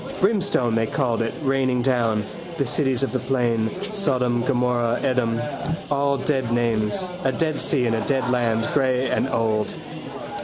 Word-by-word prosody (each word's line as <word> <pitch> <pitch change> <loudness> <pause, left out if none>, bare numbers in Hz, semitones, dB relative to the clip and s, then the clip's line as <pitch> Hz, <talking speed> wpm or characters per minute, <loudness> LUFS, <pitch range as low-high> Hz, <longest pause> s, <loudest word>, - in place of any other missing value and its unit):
Brimstone 190 - +2
they 115 0 +1
called 120 -2 0
it 115 - 0
raining 130 -2 +1
down: 115 -5 +1 0.3
the 140 - +1
cities 135 -1 0
of 135 - 0
the 130 - 0
plain: 120 -3 +1 0.2
Sodom, 125 - +1
Gomorrah, 120 -2 +1
Edom. 125 -4 +1 0.5
All 140 0 +2
dead 130 -3 0
names. 120 - +1 0.2
A 135 - +2
dead 155 +4 -1
sea 130 -5 +1
in 115 - +1
a 110 - 0
dead 130 -3 +1
land, 115 -2 +1
grey 130 -2 +1
and - - +1
old. 110 -3 0
125 Hz, 155 wpm, -23 LUFS, 115-135 Hz, 0.5 s, Brimstone